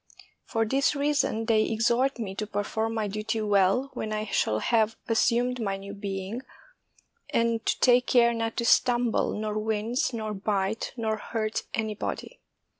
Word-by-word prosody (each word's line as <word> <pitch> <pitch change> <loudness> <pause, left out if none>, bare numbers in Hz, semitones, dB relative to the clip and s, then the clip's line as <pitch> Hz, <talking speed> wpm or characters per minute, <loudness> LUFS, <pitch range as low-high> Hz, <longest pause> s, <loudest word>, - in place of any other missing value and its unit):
For 225 0 0
this 275 +6 +1
rea 290 +1 +1
son 225 -6 0
they 220 -2 +3
exhort 235 +4 +1
me 210 -5 -4
to 210 +2 -4
perform 220 +2 -2
my 215 -2 -1
duty 215 +2 -2
well, 205 +6 +2
when 215 - -4
I 215 0 -2
shall 110 - +1
have 220 - +2
assumed 240 +2 +2
my 195 -3 -1
new 200 +1 -8
being, 200 +3 -4 0.9
and 230 -1 +1
to - - +1
take 245 0 +5
care 235 -1 +4
not 225 -1 -3
to 235 - 0
stumble, 240 -1 +3
nor 215 0 -2
wince, 220 +4 -1
nor 215 -3 -3
bite, 200 +1 -1
nor 220 -2 -1
hurt 215 0 -3
anybody. 215 -2 -4
220 Hz, 160 wpm, -27 LUFS, 210-235 Hz, 0.9 s, take